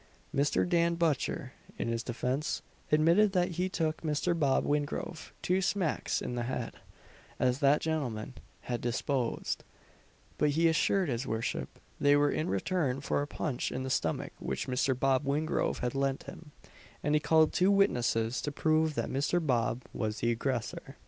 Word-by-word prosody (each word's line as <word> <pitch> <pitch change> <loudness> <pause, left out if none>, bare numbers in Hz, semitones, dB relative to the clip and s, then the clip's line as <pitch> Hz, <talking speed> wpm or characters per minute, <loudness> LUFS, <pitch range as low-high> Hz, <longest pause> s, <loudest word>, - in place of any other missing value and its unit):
Mr. 140 +4 +2
Dan 170 -1 +2
Butcher, 165 -5 -1 0.2
in - - -2
his 115 0 -1
defence, 125 +4 -2 0.3
admitted 170 +7 +4
that 180 -1 +2
he 180 +2 -1
took 160 -3 -1
Mr. 155 +2 0
Bob 145 -5 +2
Wingrove 150 +2 -2
two 185 +2 +2
smacks 185 -4 0
in - - -3
the 120 - -2
head, 120 +2 -3 0.7
as 125 +1 +2
that 140 +1 +4
gentleman 130 -9 -2 0.3
had 120 -1 -3
deposed, 120 +1 -1 0.8
but 150 - +3
he 165 +3 +3
assured 175 +3 +2
his 125 -1 -2
worship 110 +1 -3 0.2
they 145 0 +5
were 145 0 +3
in 155 - -1
return 135 - 0
for 140 - 0
a 145 - -3
punch 145 -4 -2
in 130 - -3
the 130 - -3
stomach 105 -11 -1
which - - -3
Mr. 130 0 +1
Bob 135 0 +2
Wingrove 145 +3 0
had 125 -1 -1
lent 135 -1 0
him; 160 -3 -11 0.5
and 150 - +1
he 150 - +5
called 160 -1 +4
two 185 +2 +3
witnesses 125 - +2
to 145 - -3
prove 155 +1 +2
that - - -1
Mr. 145 +6 +1
Bob 120 -2 +1
was 110 -1 -2
the 120 +3 +1
aggressor. 125 +2 -3
145 Hz, 165 wpm, -31 LUFS, 125-160 Hz, 0.8 s, they